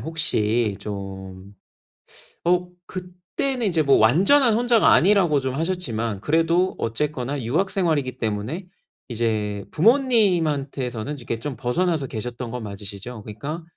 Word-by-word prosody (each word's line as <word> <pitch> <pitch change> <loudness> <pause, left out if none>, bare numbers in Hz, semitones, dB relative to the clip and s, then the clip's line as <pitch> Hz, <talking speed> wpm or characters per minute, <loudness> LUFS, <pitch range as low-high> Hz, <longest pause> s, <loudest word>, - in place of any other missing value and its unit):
혹시 115 -9 +1
좀 95 -1 -8 0.9
어, 180 +1 +2 0.2
그때는 185 +7 -3
이제 165 -4 +2
뭐 140 -1 +5
완전한 200 - +5
혼자가 235 -1 +4
아니라고 180 -5 +4
좀 130 -1 -3
하셨지만 115 - -2
그래도 165 - +2
어쨌거나 140 +3 -2
유학 160 - 0
생활이기 155 - 0
때문에 115 - -3 0.4
이제 110 -4 -1
부모님한테서는 155 - +1
이렇게 120 -3 -4
좀 135 +1 -5
벗어나서 140 +5 0
계셨던 120 +1 -5
거 125 - -4
맞으시죠? 105 +2 -7
그니까 140 +11 -6
140 Hz, 300 characters per minute, -23 LUFS, 110-180 Hz, 0.9 s, 뭐